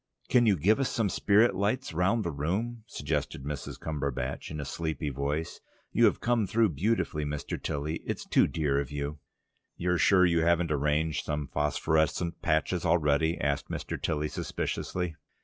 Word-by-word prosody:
"Can 120 -2 +5
you 100 -3 +4
give 100 - +3
us 135 - +1
some 110 -4 0
spirit 105 +5 +4
lights 100 +5 -1
round 95 +7 +2
the 85 - -2
room?" 105 +11 -2
suggested 65 - -3
Mrs. 75 0 -5
Cumberbatch 70 -4 -3
in 75 - -5
a 70 - -4
sleepy 80 +1 -3
voice. 70 +4 -3 0.3
"You - - +4
have - - +3
come 115 -4 +1
through 115 +1 +3
beautifully, 85 -1 0
Mr. 75 0 -4
Tilly. 75 +3 -2
It's - - -4
too - - +4
dear 75 -4 0
of 70 -3 -3
you!" 75 +1 -4 0.6
"You're 90 0 0
sure 95 -2 +5
you 85 -1 +3
haven't 85 0 +2
arranged 75 +1 +1
some 75 -2 -3
phosphorescent 80 +3 0
patches 80 +3 +1
already?" 80 -1 +2
asked 70 0 -1
Mr. - - -4
Tilly 75 -1 0
suspiciously. 90 +1 -3
80 Hz, 165 wpm, -29 LUFS, 75-95 Hz, 0.6 s, Can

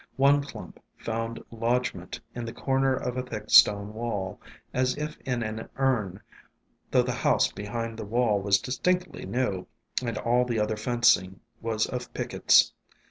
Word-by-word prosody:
One 140 +1 +5
clump 140 - -10 0.2
found 115 0 -3
lodg 120 +2 0
ment 90 0 -8
in 120 - -5
the 115 - -5
corner 135 0 +1
of 125 0 -3
a - - +1
thick 125 - -7
stone 100 0 +6
wall, 105 -5 -4 0.3
as 130 +1 +1
if 150 0 -4
in 125 -2 0
an 110 +1 -5
urn, 115 -9 0 0.7
though - - +4
the - - -2
house - - +2
behind 115 +2 -5
the - - -4
wall 110 -2 +1
was 100 0 +4
distinctly 180 +8 -1
new, 115 -7 -1 0.4
and 115 -3 -2
all 120 +1 +2
the 120 -3 -1
other 105 +1 0
fencing 105 -5 +2 0.2
was 110 -1 0
of 125 -1 -5
pickets. - - +4
115 Hz, 160 wpm, -27 LUFS, 105-125 Hz, 0.7 s, stone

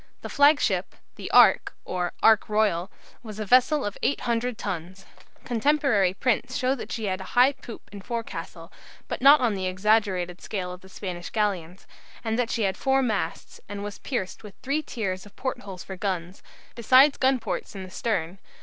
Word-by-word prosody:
The - - -5
flagship, 285 +1 +3 0.2
the - - -7
"Ark," - - +5
or 180 -1 -2
"Ark 220 -1 +5
Royal," 205 -4 +1 0.3
was 215 -3 -9
a 215 - -3
vessel 255 +7 +4
of 205 - -5
800 240 -3 -1
tons. 185 0 -6 0.4
Contemporary 240 -6 +2
prints 250 +2 0
show 255 0 +1
that 270 - -7
she 225 -2 -3
had 190 -1 -2
a 190 - -9
high 255 +3 +7
poop 235 -4 -11
and 200 -1 -10
forecastle, 230 +2 -6 0.3
but - - -5
not 280 +2 +8
on 235 -4 +2
the 190 -2 -2
exaggerated 185 -2 +1
scale 185 -4 -4
of 180 - -11
the 190 - -15
Spanish 180 -3 -6
galleons; 195 -5 -2 0.4
and 225 +1 -1
that 240 -2 0
she 230 - -1
had 190 -1 0
four 270 0 +2
masts, 205 -9 -3
and 205 0 -5
was 205 -2 -7
pierced 220 -9 -4
with 210 -3 -12
three 285 +4 0
tiers 195 -8 -4
of 205 - -19
port 260 - -3
holes 190 -3 -9
for 190 - -8
guns, 185 -2 -4 0.3
besides 260 +5 +5
gun 265 0 +3
ports 235 - -5
in 190 - -6
the 185 - -10
stern. 185 -5 -2
210 Hz, 185 wpm, -25 LUFS, 185-250 Hz, 0.4 s, not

